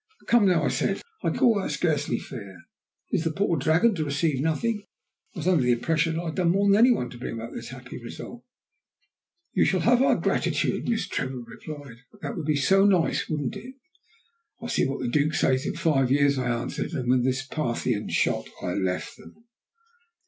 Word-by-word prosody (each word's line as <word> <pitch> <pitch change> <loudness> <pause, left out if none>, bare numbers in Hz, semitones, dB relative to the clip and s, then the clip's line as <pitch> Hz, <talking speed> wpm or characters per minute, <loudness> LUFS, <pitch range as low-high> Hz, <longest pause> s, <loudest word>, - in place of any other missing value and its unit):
"Come, 235 -4 +4
now," 180 -3 +3
I - - +2
said, - - -1 0.2
"I - - +2
call 225 -5 +3
that - - -3
scarcely 150 -4 0
fair. 100 -8 -9 0.5
Is - - +1
the 165 - +1
poor 170 +2 0
dragon 165 +9 +3
to 160 -5 -2
receive 145 -1 0
nothing? 210 +8 0 0.5
I - - -10
was 170 +1 -3
under 180 -6 +4
the 125 -1 +3
impression 160 +6 0
that 165 - -1
I - - -7
had 160 - -4
done 180 -2 +2
more 200 +3 +2
than 200 - +6
any 235 +4 +6
one 210 - +1
to 120 - -11
bring 120 - -5
about 115 +1 -7
this 115 - -7
happy 125 -1 -9
result." 175 - -9 1.1
"You - - +3
shall 185 - +2
have 245 +1 +4
our 270 - +4
gratitude," - - 0
Miss 230 -2 0
Trevor 130 -2 -3
replied. 130 +2 -10 0.2
"That 140 - -5
would 155 - -5
be 155 - +2
so 195 +8 +4
nice, 185 -5 +2
wouldn't 145 -4 -2
it?" 255 +3 -10 0.8
"We'll 235 +1 -6
see - - +1
what 135 - -4
the 125 - -1
Duke 150 +4 +1
says 130 0 +1
in - - -3
five 150 -6 +2
years," 140 0 +3
I 125 -1 -1
answered, 120 +1 -3
and 125 -2 -3
with 125 0 +3
this 130 +1 0
Parthian 120 -7 -2
shot - - 0 0.2
I 90 - -1
left 95 -1 -2
them. 230 - -16
150 Hz, 205 wpm, -26 LUFS, 125-185 Hz, 1.1 s, than